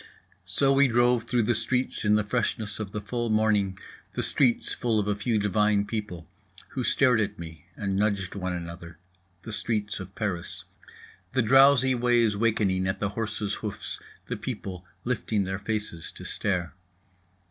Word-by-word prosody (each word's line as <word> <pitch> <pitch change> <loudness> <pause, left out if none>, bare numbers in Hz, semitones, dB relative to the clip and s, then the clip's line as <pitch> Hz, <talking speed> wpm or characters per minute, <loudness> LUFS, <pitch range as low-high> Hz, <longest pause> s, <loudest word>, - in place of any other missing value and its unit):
So 135 -1 +2
we 140 0 +5
drove 120 -1 +3
through 120 -1 +1
the 120 - +2
streets 125 +3 0
in 105 0 +4
the 105 - +2
freshness 110 -1 -2
of 105 -3 -4
the 105 - -4
full 120 +2 -2
morning, 105 -3 +2 0.4
the - - -1
streets 125 -4 +2
full 115 -3 +1
of 105 - -1
a 105 - +2
few 105 +3 0
divine 105 0 +2
people 105 -7 -5 0.4
who - - -3
stared 125 -5 +4
at 105 0 -2
me 80 -2 -10
and 100 -1 -2
nudged 100 -3 0
one 95 -2 -3
another, 85 -1 -7 0.5
the 110 - -5
streets 105 -1 -1
of 95 0 -9
Paris… 90 -2 -3 0.7
the 130 -1 +3
drowsy 135 +2 +6
ways 120 -3 +3
wakening 100 -4 +1
at 95 +1 -1
the 105 - 0
horses' 105 -1 -3
hoofs, 105 -2 -5 0.3
the - - -4
people 90 -1 -6 0.2
lifting 110 -4 0
their 95 +1 -3
faces 105 -5 -4
to - - -11
stare. 90 -4 -2
105 Hz, 165 wpm, -27 LUFS, 100-115 Hz, 0.7 s, drowsy